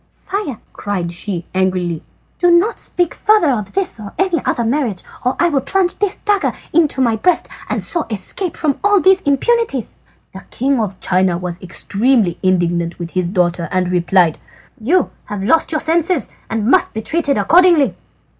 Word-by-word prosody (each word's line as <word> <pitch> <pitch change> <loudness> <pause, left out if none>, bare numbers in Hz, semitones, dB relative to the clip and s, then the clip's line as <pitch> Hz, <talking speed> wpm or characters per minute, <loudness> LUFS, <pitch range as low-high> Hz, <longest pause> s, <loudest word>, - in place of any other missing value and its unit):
"Sire," 375 - -5 0.2
cried 185 -5 -3
she 175 0 -3
angrily, 185 -3 0 0.4
"do 355 - +4
not 345 +6 +3
speak 350 -2 -1
further 420 -9 +3
of 210 -6 -3
this 385 -10 -1
or 205 -2 -9
any 370 -6 0
other 235 - 0
marriage 230 -5 -1 0.2
or 250 - 0
I 345 - +3
will 280 -4 +1
plunge 360 +6 0
this 410 -1 0
dagger 410 -2 0 0.2
in 320 -1 +4
my 240 -4 +2
breast 355 +9 +1 0.2
and - - -2
so 340 -3 -2
escape 225 - -3
from 295 -4 -1
all 410 0 +4
these 380 +1 +4
importunities." 285 - 0 0.4
"The 190 - -9
king 270 +1 0
of 200 -4 -3
China 185 -1 +1
was 180 0 -5
extremely 200 +2 0
indignant 175 -2 0
with 170 -1 -6
his 180 -2 -1
daughter 175 -2 0
and 185 -1 0
replied: 175 -2 +2 0.4
"You 320 +12 +1
have 205 -2 -5
lost 315 +12 +2
your 310 - -1
senses 330 -1 +1 0.2
and 225 -1 -2
you 220 - 0
must - - +3
be 220 - -3
treated 315 -1 0
accordingly." 340 -5 +4
245 Hz, 175 wpm, -17 LUFS, -, 0.4 s, do